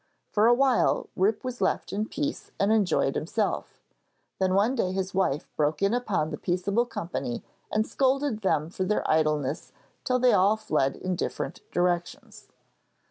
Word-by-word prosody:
For 215 +1 +4
a 240 - +7
while 265 -2 +2
Rip 205 +5 +1
was 255 -1 -5
left - - 0
in 210 +2 -1
peace 295 +3 -4
and 200 +2 +3
enjoyed 185 -10 +2
himself; 205 +7 -2 0.6
then 190 -1 +2
one 210 +6 +3
day 205 -8 0
his 190 0 -2
wife 175 -6 0
broke 150 +4 0
in 200 +3 +3
upon 205 -10 0
the 150 - -5
peaceable 195 +7 0
company 165 - -4 0.3
and 215 +1 +1
scolded 265 -1 0
them 160 -5 0
for 185 - -2
their 210 +3 0
idleness 155 -2 0 0.3
till 255 - +1
they 250 0 +4
all 200 +4 +4
fled 140 -10 0
in 185 -1 -3
different - - -4
directions. 175 -1 -2
195 Hz, 160 wpm, -27 LUFS, 170-225 Hz, 0.6 s, a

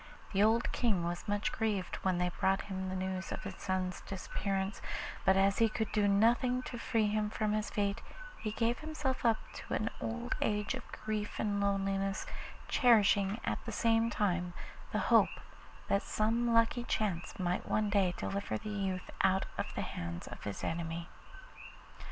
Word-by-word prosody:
The 195 - +3
old 225 +3 +4
King 210 -8 +1
was 175 +3 -3
much 205 0 0
grieved 210 -4 -1
when 185 -2 0
they 180 0 +1
brought 195 0 +2
him 190 -1 -4
the 185 - -3
news 185 0 -3
of - - -4
his - - -5
son's 185 -1 -2
disappearance, 195 0 -2 0.4
but 190 0 +5
as 195 +1 +3
he 225 -1 +5
could 220 -1 -2
do 210 -1 +3
nothing 240 +5 +3
to 240 - -6
free 225 -2 +1
him 210 0 +1
from 215 -1 0
his 215 0 0
fate, 200 -1 0 0.4
he 215 - -2
gave 230 +2 +1
himself 300 -4 -2
up 230 -2 +4 0.2
to - - -4
an 215 - -1
old 240 +2 -2
age 210 0 +1
of - - -7
grief 215 -1 -3
and 205 -1 0
loneliness, 195 -1 0 0.4
cherishing 210 -4 +4
at - - -2
the - - -4
same 230 0 +3
time 180 -5 0 0.4
the - - 0 0.2
hope - - +5 0.5
that 200 - +3
some 230 +2 +1
lucky 230 +1 +4
chance 195 -7 -1
might 180 -1 -1
one 210 -1 +1
day 190 -4 +3
deliver 100 +2 -2
the 215 - -7
youth 195 -3 -2
out 190 0 +3
of - - -2
the - - -1
hands 85 0 -5
of - - -9
his 100 -1 -4
enemy. 165 0 -3
205 Hz, 175 wpm, -33 LUFS, 190-220 Hz, 0.5 s, but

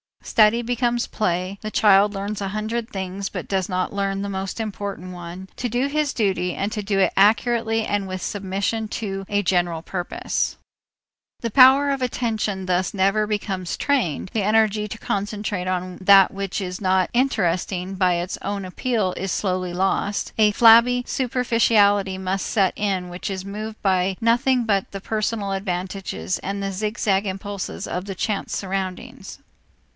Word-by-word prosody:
Study 220 +2 +4
becomes 240 0 0
play, 185 -1 -2
the 215 - -4
child 205 -1 +5
learns 200 +1 -4
a 195 - -2
hundred 220 +3 -3
things 195 -2 -4
but - - -6
does 190 -2 0
not 185 0 -2
learn 195 -1 -1
the 200 - -3
most 190 +1 -4
important 200 -4 -5
one, 175 +2 -8
to 245 - -2
do 245 +4 0
his 295 0 0
duty 190 -5 0
and 200 +2 -2
to 215 -2 -3
do 200 -1 0
it 195 - +3
accurately 225 +2 +3
and 205 -1 -1
with 185 0 -5
submission 200 +3 -2
to 195 -3 -4
a 205 0 +1
general 175 -3 +1
purpose. 180 +1 -3 0.8
The 230 - -2
power 270 +4 +7
of 275 -1 -2
attention 220 -6 -2
thus 180 0 0
never 200 +2 +2
becomes 195 -4 -2
trained, 235 - 0
the 220 - +1
energy 215 0 +2
to 215 - -7
concentrate 205 -2 -3
on 185 0 -2
that 195 0 +6
which 195 0 -3
is 180 0 -5
not 185 -1 +2
interesting 190 -7 0
by 185 -1 +3
its 175 +1 -2
own 200 -1 -3
appeal 190 0 -1
is 195 0 -3
slowly 185 -2 -1
lost, 195 +2 -1
a 215 -1 +5
flabby 235 +3 +6
superficiality 225 -6 +2
must 190 +1 -2
set 195 -3 +2
in 190 -3 -1
which 175 +3 -5
is 190 -1 -4
moved 215 +2 -6
by 190 -1 +1
nothing 245 +2 +3
but 200 -4 0
the 195 - -6
personal 215 -1 -2
advantage 190 0 -3 0.3
and 200 +1 -3
the 195 - -2
zigzag 205 0 0
impulses 195 +1 -5
of 180 +1 -4
the 195 -1 -5
chance 205 +3 -2
surroundings. 195 +6 -5
200 Hz, 160 wpm, -22 LUFS, 190-220 Hz, 0.8 s, power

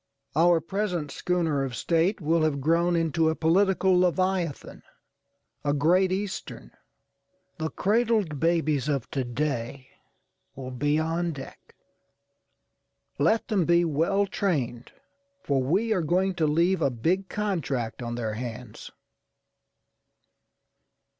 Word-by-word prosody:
Our 170 +2 +5
present 175 -4 -2
schooner 165 -6 0
of 130 -3 -4
State 170 - +1
will 165 0 +1
have 155 -3 +1
grown 170 +4 +2
into 165 -1 +1
a 160 - -1
political 190 +3 +3
leviathanâ€"a 165 -6 -3
Great 180 +6 +3
Eastern. 190 - -5 0.9
The 160 0 -1
cradled 210 - +1
babies 155 -4 +1
of 140 -5 -1
to 135 - -1
day 130 0 -3 0.7
will 130 -1 -7
be 145 +4 0
on 165 +2 -1
deck. 135 -2 -11 1.4
Let 215 +10 +2
them 205 -6 +1
be 170 +1 +3
well 165 +6 +1
trained, 135 - -2 0.5
for 140 -2 +1
we 195 - +1
are 185 - 0
going 185 +4 +1
to 165 -3 0
leave 170 +4 +2
a 140 - +3
big 170 +11 -1
contract 150 - -2
on 120 0 -4
their 110 -3 -3
hands. 115 0 -7
165 Hz, 115 wpm, -26 LUFS, 140-185 Hz, 1.4 s, Our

